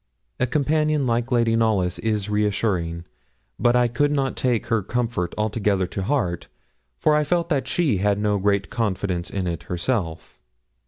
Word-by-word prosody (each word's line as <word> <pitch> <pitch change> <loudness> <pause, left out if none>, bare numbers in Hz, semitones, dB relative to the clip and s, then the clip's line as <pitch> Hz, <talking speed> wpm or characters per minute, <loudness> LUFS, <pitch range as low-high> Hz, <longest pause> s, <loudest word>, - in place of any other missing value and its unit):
A 130 - +2
companion 150 +1 +1
like 120 +1 0
Lady 115 -2 +3
Knollys 105 -6 +1
is 105 -2 -1
reassuring; 100 -5 -1 0.5
but 120 +1 +3
I 125 0 +4
could 145 +5 +1
not 135 -3 0
take 125 -3 0
her 115 -1 +1
comfort 115 -4 -2
altogether 105 -3 +1
to 95 - -5
heart, 95 - -1 0.5
for 150 - +3
I 150 - +3
felt 170 +2 0
that 135 -5 0
she 150 - +1
had 100 +1 +1
no 105 -1 +1
great 100 0 0
confidence 95 -5 -1
in 95 -2 -3
it 85 -3 -3
herself. 90 -2 -2
110 Hz, 160 wpm, -23 LUFS, 95-130 Hz, 0.5 s, I